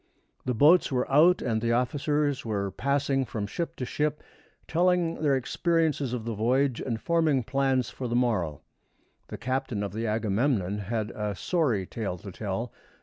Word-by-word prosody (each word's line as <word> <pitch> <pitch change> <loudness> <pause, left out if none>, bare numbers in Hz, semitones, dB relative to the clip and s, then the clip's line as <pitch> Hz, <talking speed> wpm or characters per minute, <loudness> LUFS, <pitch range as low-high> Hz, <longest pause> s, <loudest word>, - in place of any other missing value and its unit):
The 125 -1 0
boats 155 +8 +5
were 125 -1 0
out, 165 +6 +5
and 110 -3 0
the 115 0 +1
officers 145 +3 0
were 100 -3 -2
passing 140 +1 0
from 110 -4 -4
ship 165 +11 -4
to 125 - -4
ship, 150 +4 -2 0.4
telling 175 -1 +1
their 145 -3 +3
experiences 155 0 0
of 120 -3 -4
the 115 - -2
voyage, 125 +4 +1
and 115 -4 -2
forming 160 -3 +2
plans 135 0 0
for 130 - -5
the 120 - -2
morrow. 105 - 0 0.7
The - - -7
captain 130 -4 -2
of 100 -2 -4
the 115 +2 -2
Agamemnon 105 -1 0
had 105 +1 -3
a 105 -1 -3
sorry 125 - 0
tale 100 -3 -4
to 95 +3 -9
tell. 105 +5 -4
125 Hz, 165 wpm, -27 LUFS, 110-145 Hz, 0.7 s, boats